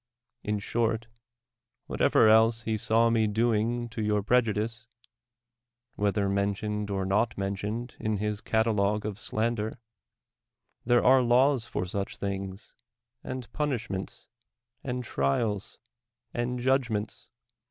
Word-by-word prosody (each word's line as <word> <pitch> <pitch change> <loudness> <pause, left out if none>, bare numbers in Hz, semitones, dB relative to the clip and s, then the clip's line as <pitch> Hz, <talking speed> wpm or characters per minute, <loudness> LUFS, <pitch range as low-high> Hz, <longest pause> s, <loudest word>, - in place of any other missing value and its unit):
In 105 0 -1
short, 115 +2 -1 0.8
what - - -5
ever - - +5
else 110 +1 +5
he 110 -1 -1
saw 115 +2 +3
me 110 -1 +3
doing 115 +2 +1
to 115 -1 -5
your 105 -1 +1
prejudice, 115 0 0 1.1
whether 100 0 0
mentioned 100 +1 -1
or 95 -1 -1
not 105 +4 +1
mentioned 100 +5 -3
in 110 -1 -1
his 105 +1 -2
cata 110 +1 +1
logue 105 0 +1
of 105 -1 -4
slander, 110 -1 -2 1.1
there 120 0 +3
are 130 +1 +7
laws 125 +1 +3
for 90 - -3
such 100 +2 -4
things, 95 0 -5 0.5
and 130 -2 -6
punishments, 120 -10 -3 0.6
and 125 -1 -3
trials, 100 - -1 0.6
and 120 +1 -2
judgments. 120 -5 -1
110 Hz, 120 wpm, -28 LUFS, 105-120 Hz, 1.1 s, are